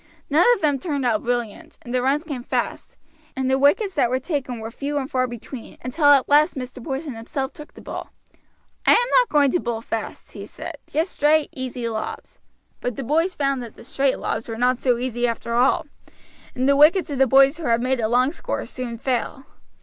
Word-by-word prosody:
None 320 +8 +5
of 405 - -10
them 290 -3 +2
turned 285 -4 -2
out 225 -3 +1
brilliant, 240 -3 -3
and 240 - -7
the 250 - +2
runs 275 +4 +1
came 285 -7 -5
fast, - - -3 0.4
and 265 -1 -1
the 265 - +2
wickets 380 +8 +2
were 250 +1 +2
taken 265 -5 -3
were 225 +1 -6
few 285 +4 -3
and 270 -2 -2
far 255 -1 +1
between, 240 +1 -9
until 260 +5 -1
at 285 -2 +6
last 300 +4 +4
Mr. 255 -1 -7
Porson 275 +2 -4
himself 265 +4 -4
took 300 - -12
the - - -13
ball. - - -7 0.7
"I - - +6
am 485 +1 +3
not - - +1
going 285 -3 +4
to 355 - +1
bowl 235 -5 -3
fast," 225 -1 -5
he - - -9
said, - - -8
"just 320 +5 -1
straight 300 +1 +2
easy 255 -2 -4
lobs;" 220 -1 -6 0.4
but 245 -2 -3
the 270 - -4
boys 325 +8 +1
found 275 -2 0
that 235 -3 -9
the - - -13
straight 270 +2 0
lobs 230 - -3
were 225 - -4
not 250 +1 +2
so 250 -3 +2
easy 245 -1 -1
after 235 0 -3
all, 245 +3 +3 0.7
and 255 +1 0
the 280 - +5
wickets 310 +4 +5
of 275 - -3
the 270 - +5
boys 275 +3 +5
who 335 - -7
had 230 -2 +2
made 260 0 +1
a 220 - +1
long 250 +4 +2
score - - -4
soon 245 -2 -6
fell. 260 +2 -2
265 Hz, 215 wpm, -22 LUFS, 245-290 Hz, 0.7 s, at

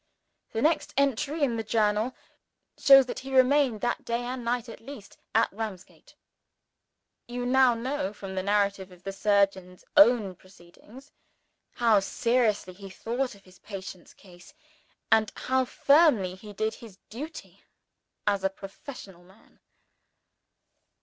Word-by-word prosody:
The 225 - -1
next 315 +2 +1
entry 280 +3 0
in 240 -5 +1
the 225 - -2
Journal 215 +2 0 0.6
shows 270 -1 +7
that 250 - -5
he 265 0 -6
remained 260 -3 +3
that 240 - -1
day 235 +1 -2
and 250 0 -5
night, 240 0 -1
at 230 - -10
least, 240 -4 -12 0.2
at 225 -2 +3
Ramsgate. 210 -4 -8 1.1
You 245 0 -4
now 255 -1 +4
know, 235 -4 -3
from 195 -2 -8
the 190 - -2
narrative 200 -1 0
of 180 0 -17
the 195 - -4
surgeon's 195 -3 0
own 240 -9 +5
proceedings, 190 +9 -17 0.6
how 230 -4 +4
seriously 215 -1 0
he 195 +1 -11
thought 240 +5 -3
of 200 - -20
his 185 0 -20
patient's 190 -3 -9
case, 180 -2 -17 0.6
and 220 -1 +4
how 260 0 0
firmly 275 - +3
he 205 +3 -11
did 215 +2 -2
his 220 -5 -13
duty 295 +9 -9 0.6
as 200 -2 +1
a 195 - +2
professional 195 -1 -11
man. 190 +4 -23
220 Hz, 135 wpm, -27 LUFS, 195-255 Hz, 1.1 s, shows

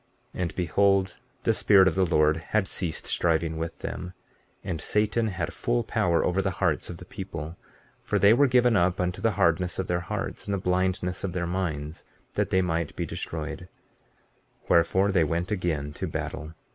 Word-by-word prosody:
15:19 - - -5
And 85 -3 -2
behold, 95 +2 +2 0.3
the - - +3
Spirit 95 -2 +5
of 90 - +2
the 95 +1 +2
Lord 75 -1 +3
had 95 +4 -1
ceased 85 -6 -2
striving 80 -1 0
with 80 0 -5
them, 90 +1 -5 0.5
and 90 -5 -4
Satan 110 +2 +1
had 95 -5 -3
full - - 0
power 85 -2 +1
over 95 +2 +1
the 95 - 0
hearts - - 0
of 85 - -6
the 90 - -11
people; 85 -5 -7 0.5
for - - -1
they 100 +2 +6
were 140 +4 +5
given 125 -2 +4
up 90 -1 +2
unto 90 0 -1
the 115 -2 +2
hardness 90 -1 +2
of 95 - -1
their 85 0 0
hearts, 85 - -5
and 100 - -1
the - - -1
blindness 90 0 0
of 95 -3 -2
their 90 -1 -1
minds 85 -4 -3 0.3
that - - 0
they 95 0 +2
might 85 -3 -2
be - - -2
destroyed; 80 +2 -5 1.0
wherefore 95 +4 +3
they 90 -4 +3
went 85 +5 -1
again 80 -7 -1
to - - -4
battle. 80 +2 -5
90 Hz, 185 wpm, -27 LUFS, 80-95 Hz, 1.0 s, they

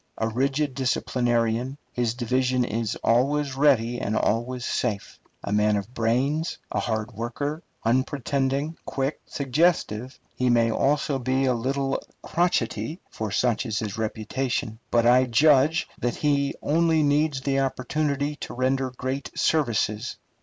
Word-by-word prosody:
A 110 - 0
rigid 135 +4 0
disciplinarian, 120 -1 0 0.2
his 120 -2 0
division 125 +1 +1
is 115 -1 -2
always 135 +4 +2
ready 120 -4 +3
and 110 +2 -1
always 120 +3 0
safe. 110 -5 -2 0.2
A 100 - -4
man 105 0 +3
of 100 +4 -4
brains, 130 +8 0
a - - 0
hard 110 0 -2
worker, 140 +8 -3 0.2
unpretending, 135 +4 0
quick, 135 +2 -2
suggestive, 135 -4 0 0.2
he 125 0 +1
may 115 -1 +3
also 140 +2 +1
be 130 +2 +1
a 130 - +3
little 135 +3 -1 0.2
crotchety, 160 - 0
for 110 -1 -4
such 120 +3 +1
is 110 -2 -2
his 105 -3 -3
reputation; 110 +1 -2
but 120 -1 +3
I 125 +2 +6
judge 145 +5 +4
that 120 -1 -1
he 140 -2 +1
only 160 0 +3
needs 145 -1 +2
the 135 0 +1
opportunity 140 +2 -1
to - - -7
render 130 +1 +1
great 130 +2 -4
services. 120 -6 0
130 Hz, 135 wpm, -25 LUFS, 115-140 Hz, 0.2 s, I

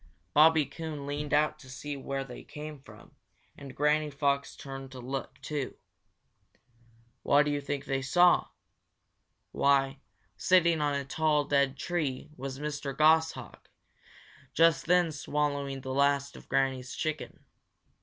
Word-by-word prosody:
Bobby 155 0 +6
Coon 155 -3 -6
leaned 145 +1 -4
out 150 +1 +2
to 130 - -14
see 145 +2 -6
where 135 0 -4
they 125 -2 -10
came 150 -1 -9
from, - - -16 0.4
and 140 -2 -11
Granny 150 +1 +2
Fox 140 -1 -1
turned 135 -1 -8
to 130 - -8
look, 135 +1 -5
too. 145 -1 -4 1.5
What 145 +1 +4
do 150 - 0
you 145 0 -1
think 140 0 -4
they 135 -2 -1
saw? 175 +6 +4 1.0
Why, 135 0 +2 0.4
sitting 170 -3 +3
on 145 -1 +1
a 140 -1 -2
tall, 150 +1 +1
dead 140 -1 +1
tree 150 -4 -3
was 135 -1 -6
Mr. 145 -2 -4
Goshawk, 160 +1 +2 0.9
just 165 -4 +4
then 175 -1 +4
swallowing 145 -2 -2
the 130 0 -5
last 140 0 +1
of - - -14
Granny's 135 -1 0
chicken. 155 -1 -4
145 Hz, 135 wpm, -29 LUFS, 135-155 Hz, 1.5 s, Bobby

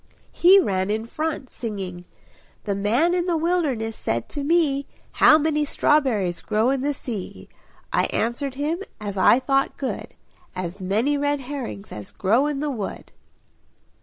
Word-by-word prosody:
He 375 +3 +6
ran 190 - 0
in 220 +2 -1
front, 305 +2 -3
singing 190 -6 -6 0.6
"The 205 - -1
man 230 - +2
in 355 0 0
the 340 -2 +1
wilderness 300 -10 0
said 115 0 -2
to 290 - -4
me, 290 -3 +2 0.2
'How 310 - +6
many 300 -1 +1
strawberries 240 - +1
grow 220 +4 +1
in 270 -1 0
the 290 +2 0
sea?' 225 -7 -7 0.5
I - - +3
answered 250 +4 -2
him 305 +6 -2 0.2
as 205 -2 -5
I 190 +5 +5
thought 270 +1 0
good 270 - -5 0.4
'As 185 +1 -5
many 225 +10 +1
red 285 0 0
herrings 250 -6 -6
as 105 -1 -8
grow 230 +9 +2
in 290 -2 -2
the 300 -1 -1
wood.'" 215 -7 -6
260 Hz, 155 wpm, -23 LUFS, 205-295 Hz, 0.6 s, He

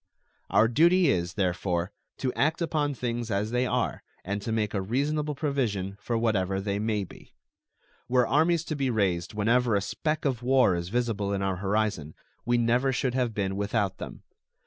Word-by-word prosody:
Our 110 - +5
duty 170 +7 +4
is, 90 -1 -1
therefore, 90 -1 -1 0.3
to 130 -2 -2
act 155 +3 +1
upon 150 -4 0
things 120 -2 -3
as 105 +1 -1
they 125 +1 +1
are - - -1 0.2
and 100 +2 -2
to 115 - -4
make 110 -2 0
a 100 - 0
reasonable 145 +8 -1
provision 120 -10 -1
for 115 - -1
whatever 100 -4 +1
they 100 0 -2
may 105 -1 0
be. 95 - -14 0.7
Were 125 -1 +4
armies 160 +5 +2
to 155 - -4
be 135 -2 0
raised 95 -5 0
whenever 115 +2 +2
a 100 - +2
speck 155 +10 -2
of 130 -4 0
war 130 -5 +4
is 85 0 -4
visible 110 -3 -1
in 100 0 -1
our 95 -1 -1
horizon, 100 -5 -1 0.3
we 120 0 +3
never 120 +3 +2
should 130 -1 -1
have 125 -4 0
been 95 -2 -1
without 100 -1 -1
them. - - -8
115 Hz, 180 wpm, -27 LUFS, 100-130 Hz, 0.7 s, Our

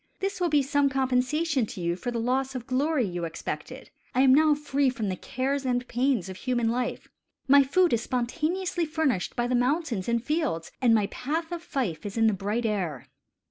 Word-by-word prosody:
This 390 -1 -3
will 350 - +2
be 295 -2 +3
some 285 +1 +2
compensation 265 +1 +1
to - - -8
you 170 0 0
for 185 +7 -4
the 240 - -3
loss 260 +3 0
of 245 -2 -5
glory 270 +1 +1
you 175 -2 -4
expected. 165 -1 -6 0.2
I 255 - +4
am 265 -1 +6
now 305 +1 +5
free 285 -2 +1
from 230 -6 -3
the 185 - -1
cares 270 +8 -2
and 250 -1 -1
pains 245 -5 0
of 190 -1 -7
human 240 -2 0
life. 245 +1 -2 0.4
My 280 +1 +7
food 340 +5 +3
is 230 - +2
spontaneously 330 +9 -1
furnished 300 - -1
by 240 -2 0
the 250 - -1
mountains 250 - 0
and 235 -1 +1
fields, 295 - -1
and 235 -3 +5
my 210 -2 +3
path 320 +6 -3
of 345 -1 -4
fife 255 - -3
is 205 +1 -6
in 225 - +4
the 220 - +4
bright 205 +5 -2
air." 180 - -2
255 Hz, 205 wpm, -27 LUFS, 225-290 Hz, 0.4 s, My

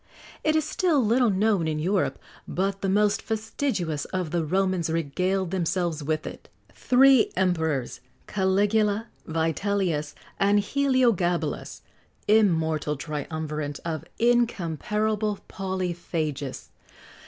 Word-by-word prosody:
[XX - - -21
67] - - -3
It 310 - +3
is 315 - +3
still 310 -10 +2
little 235 +2 +3
known 200 -3 +2
in 155 -1 -1
Europe, 185 +5 0 0.3
but 195 +2 -2
the 195 - 0
most 210 +2 +2
fastidious 215 - -2
of 185 -4 -3
the 170 -1 0
Romans 185 0 0
regaled 180 +4 -1
themselves 175 -3 -1
with 155 +1 -1
it.[XX - - -12
68] - - -21
Three 260 -1 +6
Emperors, 160 -8 0 0.3
Caligula, 205 +3 +1 0.2
Vitellius, 165 -1 -1 0.2
and 200 +1 +4
Heliogabalus 235 -8 0 0.5
immortal 160 -8 +2
triumvirate 150 0 -4
of 160 -3 -3
incomparable 215 -2 +1
polyphagists! 175 -7 -3
185 Hz, 110 wpm, -26 LUFS, 160-210 Hz, 0.5 s, Three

